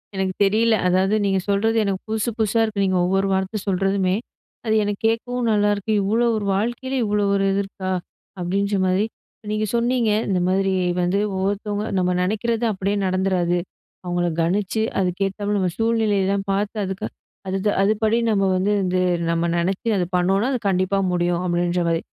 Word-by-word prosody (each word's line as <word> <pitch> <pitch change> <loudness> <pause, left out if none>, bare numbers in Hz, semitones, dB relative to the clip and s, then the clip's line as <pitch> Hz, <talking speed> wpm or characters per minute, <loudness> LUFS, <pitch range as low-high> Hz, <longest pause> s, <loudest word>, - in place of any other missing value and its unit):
எனக்கு 190 -1 -1
தெரியல. 220 +3 +3
அதாவது 190 +3 +2
நீங்க 195 -1 +1
சொல்றது 220 +3 +2
எனக்கு 195 -2 -1
புதுசு 220 +1 0
புதுசா 220 +1 +1
இருக்கு. 210 -3 -1
நீங்க 185 -1 +1
ஒவ்வொரு 195 +2 +1
வார்த்த 190 +3 -1
சொல்றதுமே! 195 0 +1 0.5
அது 220 -1 +2
எனக்கு 205 -1 -3
கேட்கவும் 240 +2 -1
நல்லாயிருக்கு. 205 0 +1
இவ்ளோ 225 +5 +2
ஒரு 210 -2 -2
வாழ்க்கையில 240 +5 -2
இவ்ளோ 210 0 +1
ஒரு 195 0 +1
இது 195 - +1
இருக்கா! 195 -1 -6 0.5
அப்பிடின்றமாரி 190 +2 +1 0.5
நீங்க 215 0 0
சொன்னீங்க, 235 -1 +1 0.2
இந்த 190 -2 +1
மாரி 190 +1 +1 0.3
வந்து 180 +3 +1 0.2
ஒவ்வொருத்தவங்க 205 +2 -2
நம்ம 180 0 +1
நினைக்கிறது 220 +5 -1
அப்பிடியே 195 0 -1
நடந்துறாது. 185 -2 +1 0.5
அவுங்கள 175 -1 -1
கணிச்சு 195 +5 0 0.2
அதுக்கேத்தாப்புல 195 +3 -1
நம்ம 185 -1 +1
சூழ்நிலை 225 -2 +1 0.2
தான் 195 -1 -2
பார்த்து 200 +2 -1
அதுக்கு 190 +2 -4 0.4
அது 190 +1 -1 0.2
அதுபடி 215 +2 +2
நம்ம 195 -2 +2
வந்து 190 +3 +1
இது 185 0 0 0.3
நம்ம 170 0 0
நினச்சு 190 +7 -1
அது 180 - +1
பண்ணோன்னா, 195 +5 +2
அது 250 - -1
கண்டிப்பா 185 +1 +1
முடியும். 175 0 0
அப்பிடின்றமாரி, 175 -1 0
195 Hz, 150 wpm, -22 LUFS, 185-215 Hz, 0.5 s, தெரியல